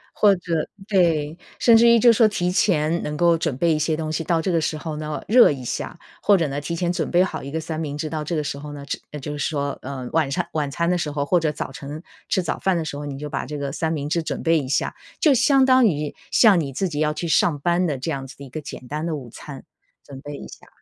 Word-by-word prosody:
或 205 -2 +5
者， 170 -3 -2 0.2
对， 165 -7 +2 0.2
甚 235 - +5
至 230 +1 +6
于 235 - +7
就 235 +1 +6
说 225 0 +5
提 180 -4 -1
前 170 -4 +2
能 150 0 -4
够 170 +1 +4
准 160 -5 -2
备 170 +2 +2
一 155 - 0
些 155 0 0
东 155 -1 -3
西， 160 +1 -2
到 165 +1 +1
这 170 +3 -1
个 165 -2 +2
时 155 - -1
候 155 0 -5
呢， 150 0 -4
热 240 +2 +7
一 135 -4 -4
下。 - - -4 0.2
或 205 - +5
者 165 -3 0
呢， 140 +1 -3
提 170 +3 -4
前 175 +1 -1
准 175 - -2
备 175 +1 +4
好 190 - -4
一 135 - -7
个 160 +3 -3
三 160 0 -5
明 145 -2 -4
治， 155 +1 -4
到 155 -1 -2
这 165 +3 -3
个 155 - 0
时 140 -1 -4
候 145 0 -8
呢， 140 -1 -8 0.3
这 150 - -6
就 145 +2 -6
是 145 - -1
说， 140 -2 -2
呃， 130 -1 -6
晚 160 -3 +2
上 - - -1
晚 150 -2 -1
餐 170 +5 -1
的 180 +1 +2
时 160 - -2
候 145 -1 -2
或 175 +4 +3
者 160 -2 0
早 140 - -5
晨 145 +4 -8 0.3
吃 185 - +1
早 - - -3
饭 190 -2 +1
的 165 - -2
时 155 - -5
候， 145 +1 -6
你 140 -1 -5
就 150 +2 -5
把 145 - -3
这 150 +2 -5
个 140 -1 -3
三 160 +3 -2
明 145 -3 -2
治 170 +3 0
准 160 - -4
备 165 -1 +3
一 135 - -5
下， - - 0 0.2
就 300 -5 +5
相 265 +1 +4
当 255 -2 +5
于 150 -5 -2 0.2
像 210 -6 +5
你 140 -4 -3
自 190 +9 -1
己 150 -4 -4
要 150 0 +2
去 170 +3 -4
上 160 -2 +2
班 175 +4 +1
的 145 -4 -2
这 130 +6 -3
样 135 -2 -4
子 130 - -13
的 140 - -10
一 - - -12
个 155 - -5
简 130 -3 -9
单 150 +4 -3
的 165 - -1
午 130 -5 -8
餐， 140 -3 -10 0.4
准 135 -2 -10
备 145 0 -7
一 - - -9
下。 - - -14
155 Hz, 310 characters per minute, -22 LUFS, 145-175 Hz, 0.4 s, 于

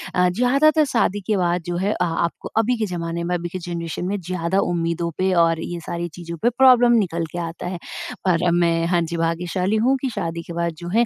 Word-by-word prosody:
अ, 180 0 +4
ज़्यादातर 275 - +3
शादी 230 -6 0
के 215 - +2
बाद 175 -1 +1
जो 175 -1 -2
है 195 +4 0
अ, - - -1
आपको 170 0 -2
अभी 230 +2 +2
के 220 - 0
ज़माने 170 -2 -3
में, 180 +1 -1
अभी 175 0 -3
के 185 - -5
जनरेशन 170 0 -4
में 200 +2 -1
ज़्यादा 180 +1 -1
उम्मीदों 170 0 -1
पे 190 0 +1
और 165 -1 0
ये 175 0 -5
सारी 170 +1 -4
चीज़ों 170 0 -7
पे 240 - +5
प्रॉब्लम 250 -2 +6
निकल 170 -1 -3
के - - -6
आता 170 +1 -5
है। 180 0 -4 0.5
और 175 -1 +3
मैं 170 -1 +2
हाँ 175 0 +2
जी, 170 0 -3
भाग्यशाली 175 +4 0
हूँ 265 +3 +4
कि 265 - -1
शादी 170 -7 -4
के 170 - -8
बाद 170 0 -1
जो 170 - -8
है 230 +6 +3
175 Hz, 230 wpm, -22 LUFS, 170-200 Hz, 0.5 s, प्रॉब्लम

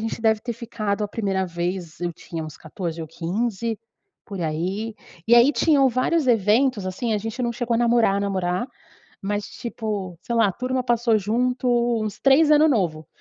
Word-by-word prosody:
gente 225 +1 -4
deve 220 -1 +2
ter 240 +1 -4
ficado 215 -3 -3
a 205 - -4
primeira 195 -4 -1
vez, 175 -1 -4
eu 175 -1 -2
tinha 165 0 -7
uns 155 - -9
14 165 +1 -6
ou 160 - -6
15, 215 +6 -2 0.5
por 195 -3 -7
aí, 185 +8 -2 0.3
e 235 - +6
aí 240 +5 +6
tinham 280 -4 +4
vários 260 +5 +1
eventos, 225 0 +3
assim, 220 +5 -2
a - - +1
gente 225 +4 -4
não 235 0 0
chegou 235 0 -1
a - - +2
namorar, 235 -4 +3
namorar, 185 0 -1 0.6
mas 205 +1 -2
tipo, 210 -7 -5
sei 235 - -3
lá, 225 -2 +4
a 195 - 0
turma 255 +4 -2
passou 235 -2 +2
junto 250 +5 0 0.4
uns 215 -1 -5
3 285 +3 +5
ano 305 +1 +6
novo 170 - 0
215 Hz, 180 wpm, -23 LUFS, 185-240 Hz, 0.6 s, e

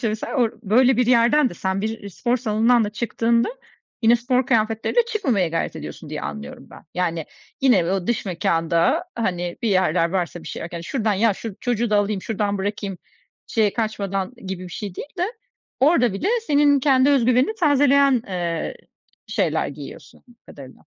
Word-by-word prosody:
işte, 230 - 0
mesela 215 +6 -4
orada 240 -4 +1
böyle 245 +5 +4
bir 245 -1 +2
yerden 250 +3 +4
de - - -9
sen 190 +2 -2
bir 220 -1 -4
spor 240 +6 -1
salonundan 230 0 +2
da 205 - -3
çıktığında 230 +1 0 0.5
yine 230 +1 +6
spor 250 +1 0
kıyafetleriyle 225 - +1
çıkmamaya 255 - 0
gayret 165 +1 -2
ediyorsun - - -8
diye - - -4
anlıyorum 70 0 -7
ben. - - -14
Yani 170 -3 -1 0.4
yine 240 -10 +4
o 190 -2 -2
dış 240 -3 -1
mekânda, 170 - +1
hani, 180 -6 -2
bir 230 - +1
yerler 180 -3 +2
varsa 175 -2 -2
bir - - -9
şeyler, 170 0 -6
"Şuradan 220 +2 -1
ya 210 +1 +2
şu 220 -2 -7
çocuğu 240 -2 -1
da 210 - +3
alayım, 205 -1 0
şuradan 205 -2 -2
bırakayım." 200 -1 -3 0.5
şeye 215 -3 +1
kaçmadan 205 -1 -2
gibi 185 -1 -5
bir - - -8
şey 200 -4 -6
değil 280 - -7
de, 365 +6 -1 0.5
orada 260 - +4
bile 200 - -2 0.2
senin 285 -1 +4
kendi 265 0 +4
özgüvenini 255 - +3
tazeleyen, 280 -4 +4
ııı, 175 - -2 0.5
şeyler - - 0
giyiyorsun, - - -11
anladığım 240 - -20
kadarıyla. 135 -2 -13
220 Hz, 170 wpm, -22 LUFS, 190-250 Hz, 0.5 s, yine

